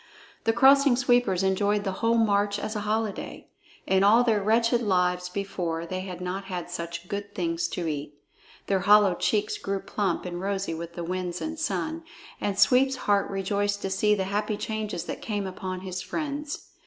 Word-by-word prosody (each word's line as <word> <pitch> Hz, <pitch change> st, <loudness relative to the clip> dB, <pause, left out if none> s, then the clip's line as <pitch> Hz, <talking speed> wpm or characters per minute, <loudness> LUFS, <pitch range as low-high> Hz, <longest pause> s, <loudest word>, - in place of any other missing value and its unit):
The 225 Hz, -, +4 dB
Crossing 275 Hz, +2 st, +6 dB
Sweepers 245 Hz, -7 st, +2 dB
enjoyed 200 Hz, +2 st, +1 dB
the 195 Hz, -, -1 dB
whole 230 Hz, 0 st, +3 dB
march 205 Hz, -2 st, +2 dB
as 215 Hz, +1 st, -4 dB
a -, -, -1 dB
holiday. 220 Hz, -1 st, -3 dB, 0.4 s
In 190 Hz, 0 st, +3 dB
all 220 Hz, +4 st, +6 dB
their 220 Hz, -4 st, +2 dB
wretched 230 Hz, +3 st, +2 dB
lives 180 Hz, -3 st, +1 dB
before 180 Hz, -4 st, -3 dB
they 185 Hz, +2 st, -4 dB
had 185 Hz, -1 st, -6 dB
not 185 Hz, +2 st, -4 dB
had 180 Hz, -2 st, -5 dB
such 170 Hz, 0 st, -5 dB
good 205 Hz, +1 st, -5 dB
things 165 Hz, -2 st, -1 dB
to 175 Hz, -, -4 dB
eat. 150 Hz, -2 st, -4 dB, 0.5 s
Their 195 Hz, -1 st, +1 dB
hollow 205 Hz, 0 st, +6 dB
cheeks 210 Hz, +3 st, 0 dB
grew 195 Hz, 0 st, -2 dB
plump 190 Hz, -3 st, -2 dB
and 175 Hz, 0 st, -5 dB
rosy 195 Hz, -2 st, -2 dB
with 170 Hz, +1 st, -7 dB
the 175 Hz, -, -4 dB
winds 180 Hz, 0 st, -3 dB
and 315 Hz, 0 st, -4 dB
sun, 320 Hz, 0 st, -2 dB, 0.4 s
and 200 Hz, -1 st, -1 dB
Sweep's 265 Hz, +5 st, +4 dB
heart 200 Hz, -1 st, +2 dB
rejoiced 200 Hz, +1 st, -1 dB
to 195 Hz, -, -2 dB
see 210 Hz, +2 st, +3 dB
the 195 Hz, -, -1 dB
happy 210 Hz, 0 st, 0 dB
changes 215 Hz, -5 st, -3 dB
that -, -, -6 dB
came 205 Hz, -3 st, -2 dB
upon 185 Hz, -1 st, -5 dB
his 185 Hz, -1 st, -5 dB
friends. 295 Hz, -1 st, -5 dB
200 Hz, 180 wpm, -26 LUFS, 180-215 Hz, 0.5 s, Crossing